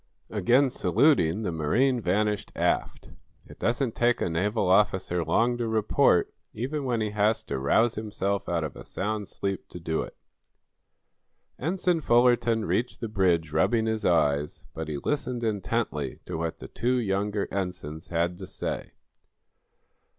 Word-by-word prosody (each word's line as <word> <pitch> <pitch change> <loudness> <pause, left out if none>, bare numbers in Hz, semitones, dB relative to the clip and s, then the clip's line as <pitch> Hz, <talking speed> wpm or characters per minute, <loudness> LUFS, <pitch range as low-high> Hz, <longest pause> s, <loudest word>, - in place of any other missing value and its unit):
Again 130 +2 +3
saluting 110 - +3
the 90 - -1
marine 120 - +1
vanished 105 +2 0
aft. - - -1 0.3
It - - -14
doesn't 120 0 0
take 120 0 +2
a 85 - -1
naval 100 +6 0
officer 95 -2 +2
long 115 +9 +1
to 120 - -1
report, 110 -3 +2 0.2
even 135 +5 -3
when 120 -3 0
he 105 -1 -1
has 105 +1 +1
to - - -4
rouse 110 - +3
himself 100 -2 -2
out 85 -2 0
of 75 - -5
a - - -9
sound 105 0 -3
sleep 95 -1 -4
to 90 - -8
do 80 -1 -1
it. - - -8 1.4
Ensign 175 +2 0
Fullerton 120 -3 +3
reached 120 +2 -1
the 115 - -4
bridge 90 -6 +1
rubbing 110 +9 +2
his 110 -1 -1
eyes, 75 -5 +1
but 80 -1 -5
he 75 -2 -3
listened 125 - -2
intently 105 -5 -2
to - - -5
what 80 0 -3
the - - -9
two 125 +2 0
younger 100 -2 -1
ensigns 85 -5 -4
had 85 +1 -1
to 95 - -7
say. - - -5
105 Hz, 150 wpm, -27 LUFS, 85-120 Hz, 1.4 s, Again